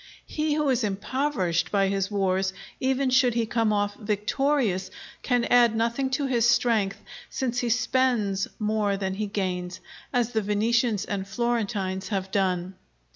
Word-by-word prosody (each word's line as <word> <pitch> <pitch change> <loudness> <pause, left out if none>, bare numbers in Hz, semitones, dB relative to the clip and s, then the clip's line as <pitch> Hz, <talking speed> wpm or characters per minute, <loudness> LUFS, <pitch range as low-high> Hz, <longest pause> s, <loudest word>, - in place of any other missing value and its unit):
He 305 -1 -1
who 300 -1 0
is 255 -2 +1
impoverished 205 - -1
by 195 -1 +2
his 195 0 -1
wars, 190 -2 0 0.3
even 265 0 +1
should 255 -2 +4
he 230 -1 +1
come 225 -1 +1
off 205 -1 0
victorious, 210 -1 0 0.3
can 245 -2 +1
add 240 -2 +4
nothing 235 +4 0
to 285 - -1
his 240 -3 +2
strength, 225 -5 +2 0.3
since 250 -2 -2
he 245 - -1
spends 235 -4 +1
more 210 -2 0
than 190 -1 -2
he 210 +2 -3
gains, 185 -3 -3 0.3
as 245 -2 +1
the 220 -2 0
Venetians 215 +2 +1
and 195 -1 -4
Florentines 200 -4 -2
have 190 -2 -3
done. 185 -2 0
215 Hz, 150 wpm, -26 LUFS, 195-245 Hz, 0.3 s, should